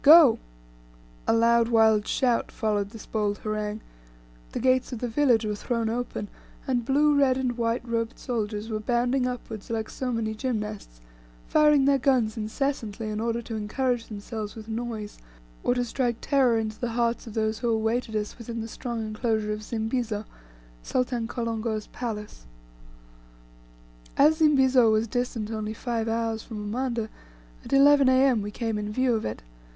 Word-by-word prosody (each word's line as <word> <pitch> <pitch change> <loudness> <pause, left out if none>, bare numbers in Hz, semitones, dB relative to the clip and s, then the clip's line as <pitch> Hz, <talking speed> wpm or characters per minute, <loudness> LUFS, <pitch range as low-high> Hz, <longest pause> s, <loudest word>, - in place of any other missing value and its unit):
Go!" 300 -5 +8 0.9
A - - +4
loud, 230 0 +4
wild 220 -2 +4
shout 245 -3 +1
followed 205 -2 -1
this 225 0 -11
bold 205 -2 -1
harangue, 215 0 -3 0.7
the - - -3
gates 255 0 +2
of 245 - -3
the 245 - -3
village 235 -2 +3
were 210 - -1
thrown 230 +1 -1
open, 235 -3 -3 0.4
and 250 -2 0
blue, 290 +4 +3
red, 270 -2 +4
and 255 -2 -1
white 235 +1 -1
robed 230 -1 -2
soldiers 220 -3 -3
were 215 - -1
bounding 245 +3 +1
upward 230 -4 -6
like 220 -1 -3
so 255 -1 -3
many 225 -2 -1
gymnasts; 210 - -4 0.4
firing 300 -3 +4
their 275 -1 +4
guns 250 -5 +2
incessantly, 220 -1 -3
in 210 0 -3
order 230 +1 -1
to 225 - -6
encourage 235 +3 -1
themselves 210 0 -6
with 220 -1 -9
noise, 225 -2 -5 0.4
or 245 - +2
to 245 0 0
strike 240 -1 -1
terror 260 -5 +3
into 220 -1 -3
the 240 -2 -2
hearts 235 0 0
of 220 - -9
those 220 -1 0
who 240 - 0
awaited 225 +1 0
us 210 +3 -3
within 235 0 -5
the 225 - -4
strong 235 -1 -4
enclosure 215 -1 -1
of 210 - -5
Zimbizo, 220 -1 -2 0.6
Sultan 245 - -1
Kolongo's 225 -2 -2
place. 210 - -6 1.7
As 305 +3 +5
Zimbizo 265 -6 +5
was 220 +1 +2
distant 230 -2 -2
only 215 0 -3
five 230 -2 -2
hours 225 -1 -1
from 220 -1 -8
Umanda, 230 +2 -2 0.6
at - - -10
11 275 0 +6
A.M. 260 -3 +4
we 205 - -4
came 225 0 -2
in 210 0 -4
view 255 +2 +2
of 220 - -1
it. 110 - -5
230 Hz, 165 wpm, -26 LUFS, 215-250 Hz, 1.7 s, Go